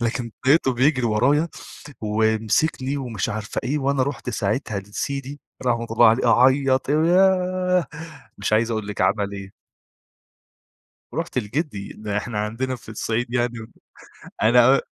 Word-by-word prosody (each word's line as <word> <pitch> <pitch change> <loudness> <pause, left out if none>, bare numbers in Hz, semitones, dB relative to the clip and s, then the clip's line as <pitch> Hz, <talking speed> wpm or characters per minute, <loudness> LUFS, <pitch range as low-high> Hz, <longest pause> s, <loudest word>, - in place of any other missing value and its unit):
لكن 115 0 -2 0.2
لقيته 135 -2 +4
بيجري 130 0 +2
ورايا 140 +9 +2 0.5
ومسكني 110 +6 0
ومش 120 -6 -3
عارفة 105 -1 -4
إيه، 145 +4 -1
وأنا 135 -1 +1
رُحت 140 -2 -4
ساعتها 110 -1 -2
لسيدي- 135 +8 -5 0.3
رحمة 115 -1 0
الله 115 +1 +6
عليه- 115 +3 +3
أعيّط، 130 0 +3
وياه! 180 +2 +2 0.5
مش - - -2
عايز 115 +2 +2
أقول 110 -2 -3
لِك 105 - -4
عمل 100 -2 +1
إيه. 100 -1 -8 1.6
رُحت 165 +1 -3
لجدّي، 120 - -3
إن 105 - -11
إحنا 105 +2 -2
عندنا 115 +5 -2
في 115 - -14
الصعيد 115 +2 -3
يعني 120 -1 0 0.9
أنا 120 +4 +5
120 Hz, 130 wpm, -22 LUFS, 110-140 Hz, 1.6 s, الله